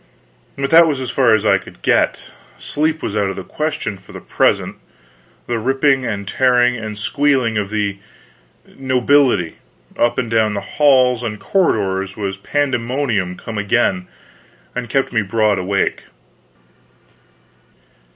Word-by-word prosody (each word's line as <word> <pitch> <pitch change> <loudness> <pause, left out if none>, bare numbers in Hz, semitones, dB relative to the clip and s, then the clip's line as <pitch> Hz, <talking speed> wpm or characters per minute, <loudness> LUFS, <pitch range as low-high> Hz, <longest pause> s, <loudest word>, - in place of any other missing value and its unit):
but 140 0 -2
that 165 0 +7
was 145 -4 -1
as 130 -2 -4
far 120 -3 +4
as 110 0 -2
I 100 -2 +4
could 90 - -15
get - - +1 0.3
sleep 155 +1 -2
was 105 - -3
out 100 -2 +1
of 95 - -5
the 95 - -6
question 150 -10 -4
for 95 - -16
the - - -7
present. - - 0 0.7
The 120 -1 -2
ripping 135 +2 +1
and 100 -3 -4
tearing 125 +2 +2
and 110 -2 -6
squealing 130 0 +1
of 100 -2 -3
the 100 -2 -2 0.7
nobility 130 - +1 0.4
up 120 0 +2
and 125 - -1
down 110 -2 +2
the 100 - -2
halls 130 +1 +3
and 110 -3 -4
corridors 100 - 0
was 100 -2 -3
pandemonium 120 -6 -1
come 110 -2 -6
again, 100 -3 0 0.7
and 125 -1 -4
kept 135 +1 0
me 115 - +2
broad 105 0 +1
awake. 100 +2 -1
115 Hz, 140 wpm, -18 LUFS, 100-135 Hz, 0.7 s, that